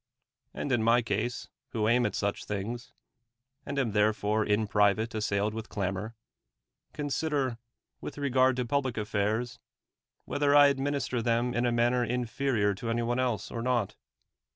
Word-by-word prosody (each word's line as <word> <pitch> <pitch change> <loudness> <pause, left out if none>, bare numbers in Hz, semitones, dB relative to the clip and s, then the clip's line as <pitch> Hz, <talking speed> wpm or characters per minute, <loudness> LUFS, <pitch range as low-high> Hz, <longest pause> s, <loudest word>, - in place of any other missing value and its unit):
And 145 - -4
in 120 -3 +2
my 115 +2 +4
case, 110 +3 -2 0.3
who 110 -2 +1
aim 120 +2 +3
at - - -5
such 100 0 -2
things, 105 +4 -4 0.7
42 - - -5
aud 140 - -1
am 115 - -3
therefore 105 +1 +2
in 105 +1 +1
private 105 +1 +2
assailed 105 -1 0
willi 110 0 -6
clamor, 100 +3 -3 0.8
consider, 145 -4 -1 0.4
with - - -7
reg 140 -3 -2
ard 130 0 +5
to 125 -1 -1
public 130 -1 0
att'airs, 110 +3 -1 0.7
whether 145 0 +2
I 145 -1 +8
administer 135 -3 -1
them 120 +1 +1
in 120 +1 +1
a - - +1
manner 120 +1 +2
inferior 120 -2 0
to 115 +4 -5
any 120 +1 0
one 120 +2 0
else, 125 -4 -1
or 115 - -4
not. 120 -4 0
120 Hz, 160 wpm, -29 LUFS, 105-125 Hz, 0.8 s, I